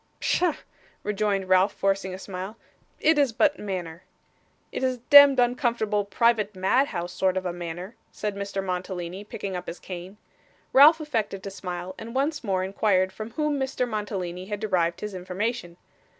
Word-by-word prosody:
'Pshaw,' 350 -4 +1 0.5
rejoined 205 -2 0
Ralph, 185 +2 +4
forcing 195 -1 0
a 185 - -6
smile. 190 +3 -7 0.4
'It 315 -1 +4
is 280 -4 +3
but 290 +6 +2
manner.' 180 -4 -5 0.7
'It - - -4
is 260 -1 +1
a - - -16
demd 285 -1 +10
uncomfortable, 235 -4 +1
private 210 -1 +1
madhouse 185 -3 0
sort 185 0 +1
of 185 - -2
a 175 - -2
manner,' 175 +4 -6 0.2
said 210 -1 -4
Mr 200 -1 -3
Mantalini, 180 0 -4
picking 200 -2 -5
up 180 0 -6
his 170 - -5
cane. 185 +2 -8 0.6
Ralph 300 +4 +8
affected 220 -10 -2
to 195 - -6
smile, 180 -1 -6
and 230 +2 -8
once 295 +3 0
more 190 -4 0
inquired 190 -1 +1
from 215 +3 -6
whom 300 +1 0
Mr. 265 -2 -1
Mantalini 190 -5 -4
had 205 -1 -4
derived 175 -5 0
his 210 -1 -5
information. 185 0 -3
200 Hz, 165 wpm, -26 LUFS, 185-235 Hz, 0.7 s, demd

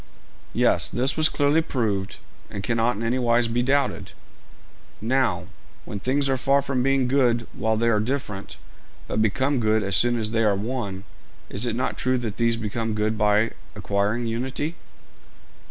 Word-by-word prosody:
'Yes; - - +2
this 130 +3 0
was 155 0 +4
clearly 145 +2 +2
proved, 105 -10 -2 0.3
and 100 - -6
cannot 115 +1 +1
in 110 - -5
any 120 +3 0
wise 120 -1 +3
be 115 +2 0
doubted.' 135 +1 0 0.9
'Now, 130 +4 +1 0.4
when 100 - -5
things 135 +6 +1
are 135 -1 +1
far 135 +2 +2
from 135 -2 0
being 135 -1 +2
good 125 -3 +2
while 110 0 0
they 115 +1 +1
are 110 -2 +3
different, 105 - -4 0.5
but - - 0
become 130 +6 +1
good 110 -1 +2
as 100 -2 +1
soon 120 +3 +3
as 110 -1 -2
they 115 0 +1
are 105 -2 +3
one, 100 -3 -4 0.5
is 110 +5 -1
it 115 - -1
not 125 - -2
true 130 0 +1
that 115 -4 -4
these 115 -1 +2
become 115 0 -3
good 110 +1 0
by 105 +1 +2 0.2
acquiring 105 +4 -1
unity?' 130 +7 -2
115 Hz, 170 wpm, -24 LUFS, 110-130 Hz, 0.9 s, was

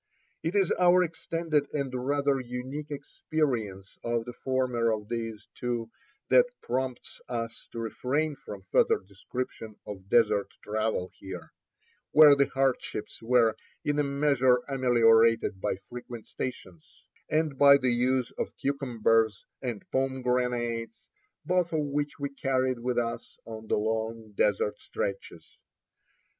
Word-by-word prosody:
It 165 +5 -2
is 195 -3 +3
our 180 0 +6
extended 165 -3 -1
and 140 -3 -2
rather 140 +2 +1
unique 130 +4 -5
experience 120 -9 -3
on 115 -1 -1
the 125 - -7
former 125 -3 0
of 105 -1 -3
these 115 -2 -4
two 120 -2 -3 0.4
that - - +6 0.2
prompts 130 -1 -3
us 115 -2 -4
to - - -9
refrain 140 +7 -1
from 100 -7 -9
further - - +4
description 110 +2 -6
of 100 -2 -9
desert 110 -3 +4 0.2
travel 110 -3 -1
here, 95 -2 -8 0.6
where 150 -2 +9
the 140 0 +3
hardships 135 -5 -1
were 115 -1 +3 0.3
in 145 0 +1
a - - +4
measure 140 -3 +3
ameliorated 115 -6 +4
by - - 0
frequent 120 -2 -8
stations, 95 -10 -7 0.3
and 155 -3 0
by 140 0 +9
the 130 -3 +1
use 125 +1 +1
of - - -3
cucumbers 115 -6 +1 0.2
and 120 -5 -4
pomegranates, 125 -3 -1 0.4
both 180 0 +1
of 155 - +2
which 145 +1 -2
we 140 0 -3
carried 130 -2 0
with 125 +1 -2
us 115 -1 -3
on 110 -1 -8
the - - +1
long 110 +1 -2
desert 105 0 +1
stretches. 90 -4 -5
125 Hz, 130 wpm, -28 LUFS, 115-140 Hz, 0.6 s, where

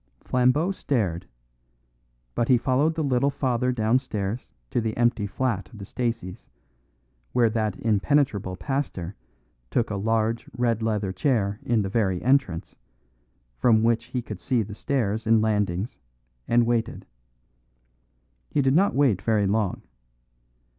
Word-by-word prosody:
Flambeau 130 +8 +2
stared; 100 - -1 1.1
but 115 - 0
he 125 - +5
followed 135 +6 +1
the 160 - -1
little 135 0 +2
father 125 -3 0
downstairs 115 -2 -1 0.2
to 120 - +1
the 110 -1 -3
empty 120 -3 +2
flat 115 -2 -2
of 115 - -13
the 100 - -8
Staceys, 115 -6 -4 0.8
where 115 -3 +3
that 110 -3 -1
impenetrable 110 -3 +1
pastor 95 -3 -3 0.5
took 115 - 0
a - - -1
large 110 +2 0
red 115 -2 +1
leather 105 -3 0
chair 100 -2 0
in 115 -3 +1
the - - -2
very 95 -3 0
entrance, 125 -10 +1 0.8
from 110 - +4
which 115 0 +2
he 125 0 -4
could 105 -4 -7
see 120 +5 +1
the 105 +1 -8
stairs 110 -3 -1
and 115 0 +5
landings, 105 -1 -1 0.5
and 120 0 +4
waited. 115 -1 -1 1.4
He 145 - +1
did 135 0 +3
not 195 +6 +3
wait 130 -10 +3
very 110 -3 +2
long. 100 -1 0
115 Hz, 135 wpm, -25 LUFS, 105-125 Hz, 1.4 s, he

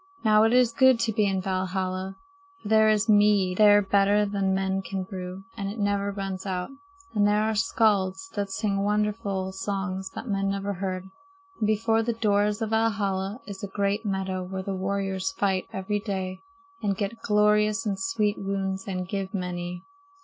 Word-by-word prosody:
"Now 215 -1 +5
it 225 - +3
is 250 -1 +4
good 260 -1 +5
to 230 -1 +1
be 210 -1 +2
in 190 -1 0
Valhalla; 185 0 -2 0.5
for - - -6
there 220 0 +5
is 215 +1 +2
mead 205 -3 +4
there 205 -1 +7
better 200 +1 +3
than 200 -2 0
men 190 0 0
can 190 0 -4
brew, 185 0 -7
and 200 -3 -3
it 210 - -6
never 200 -1 0
runs 195 -1 -4
out. 185 +3 -3 0.4
And 205 -1 +3
there 210 +1 +3
are 220 0 +1
skalds 205 0 +1
that 200 -6 -3
sing 195 0 -1
wonderful 205 -2 -1
songs 190 -1 -3
that - - -6
men 195 -2 0
never 200 +1 -2
heard. 190 0 -4 0.5
And 215 - +1
before 225 +1 +2
the 235 +1 -1
doors 210 0 +1
of 220 - -3
Valhalla 205 -1 0
is 200 -2 -8
a - - -2
great 200 +2 -1
meadow 190 -2 -2
where 190 +1 -5
the 195 - -3
warriors 195 +4 -2
fight 190 -6 0
every 195 +2 -2
day 190 -2 -4 0.4
and 200 -2 0
get 215 +3 -3
glorious 210 +1 +3
and 200 -2 -1
sweet 210 0 0
wounds 195 -1 -3
and 185 -2 -3
give 195 0 -4
many. 180 -1 -4
200 Hz, 180 wpm, -26 LUFS, 190-210 Hz, 0.5 s, there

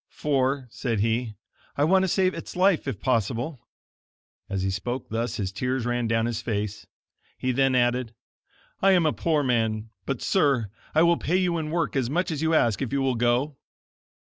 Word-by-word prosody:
"For," 135 -2 0
said 115 -5 -2
he, 115 0 0 0.4
"I 145 - +3
want 190 +5 +4
to 190 - +1
save 185 +1 +2
its - - -8
life, 185 -4 +3
if 120 -7 -3
possible." 125 +4 -1 0.9
As 95 -1 -2
he 95 - 0
spoke 120 +7 -4
thus 115 +2 -2
his 95 -3 -2
tears 125 +4 -2
ran 120 -1 0
down 115 0 +1
his 120 -2 -2
face. 105 -2 -3 0.5
He 130 - -1
then 135 +1 +2
added: 120 -1 +1 0.7
"I 195 0 +5
am 175 -3 +4
a 155 - +2
poor 155 -3 +1
man; 110 -3 0 0.2
but, 135 -3 -2
Sir, 135 - +2 0.2
I 160 - +6
will 170 0 +4
pay 175 +4 0
you 180 -3 +1
in 155 -1 -4
work 165 -2 -1
as 130 -3 0
much 175 +5 0
as 155 -2 -3
you 160 0 +2
ask 115 -6 +2
if 130 - -2
you 140 - 0
will 130 -1 +2
go." 125 +4 +1
130 Hz, 190 wpm, -25 LUFS, 115-155 Hz, 0.9 s, I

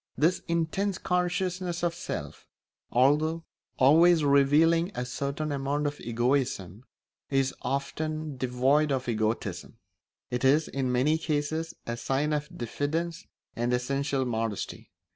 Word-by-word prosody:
This 175 +5 +2
intense 170 +4 0
consciousness 180 -1 -1
of 170 -1 +1
self, 170 - -6 0.4
although 150 +6 +2 0.3
always 160 +5 +6
revealing 150 +5 +4
a 125 - -2
certain 140 +4 -3
amount 140 +1 -1
of 145 0 -3
egoism, 120 -4 -1 0.4
is 135 -1 +1
often 155 +2 -3
devoid 130 +4 +2
of 130 -2 -1
egotism; 110 -4 -2 0.5
it 125 +1 -2
is, 145 +4 +4
in 130 -2 -2
many 145 +6 +2
cases, 155 +1 -2
a 115 0 -3
sign 140 +5 0
of 150 +1 -2
diffidence 155 +7 -3 0.3
and 120 +1 -1
essential 135 +2 -1
modesty. 115 -3 -3
145 Hz, 120 wpm, -28 LUFS, 125-160 Hz, 0.5 s, always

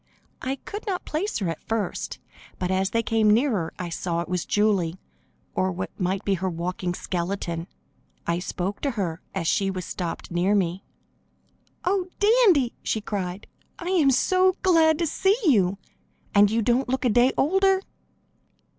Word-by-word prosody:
I 265 +1 -2
could 415 - -8
not 370 -3 -2
place 355 +8 -2
her 190 -6 -1
at 165 - -5
first, 225 -2 -3 0.4
but 180 0 -2
as 190 +1 +1
they 230 +2 0
came 220 -1 +2
nearer 215 - +2
I 180 -1 -4
saw 170 0 -2
it - - -5
was 180 -1 -2
Julie, 195 -5 +1 0.5
or 185 0 +1
what 185 +1 -4
might 185 +1 -1
be 200 - +2
her 190 0 -1
walking 175 +1 -3
skeleton. 170 -2 -3 0.6
I 170 0 0
spoke 185 +2 -4
to 280 - 0
her 170 -4 -2
as 175 -4 -1
she 195 +3 +2
was 185 -2 -4
stopped 175 -1 -5
near 180 +4 +2
me. 185 -1 0 1.0
"Oh, 370 0 +1
Dandy!" 410 - +4
she 220 - -1
cried. 195 -3 -4 0.3
"I 350 - -5
am 325 -7 +4 0.5
glad 325 -4 +5
to 335 - 0
see 385 +6 +2
you, 200 - +3 0.6
and 205 0 +6
you 225 +1 +1
don't 250 +3 +1
look 260 0 0
a - - +4
day 245 +4 +4
older!" 385 +5 +3
205 Hz, 165 wpm, -25 LUFS, 180-275 Hz, 1.0 s, and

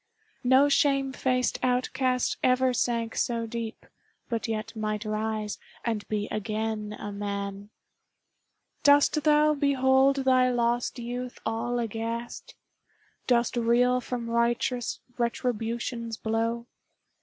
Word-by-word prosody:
No 260 +3 +5
shame 275 -2 +2
faced 255 -1 0
outcast 255 0 +1
ever 255 0 +3
sank 230 -2 -1
so 230 -1 0
deep, 230 0 -6 0.4
But 230 -1 -2
yet 225 +1 -4
might 215 0 -2
rise 215 -1 -2 0.3
and 225 -3 -2
be 210 -1 -2
again 215 0 -3
a 205 - -5
man! 200 0 -4 1.1
Dost 290 +1 +5
thou 300 0 +5
behold 270 -1 +3
thy 255 -1 +4
lost 240 +1 0
youth 245 +1 -5
all 225 +2 -1
aghast? 230 +1 -4 0.7
Dost 240 -1 +2
reel 245 +2 +3
from 245 -2 -4
righteous 235 +1 0 0.2
Retribution's 235 -1 -2
blow? 230 +2 -1
235 Hz, 110 wpm, -27 LUFS, 225-255 Hz, 1.1 s, No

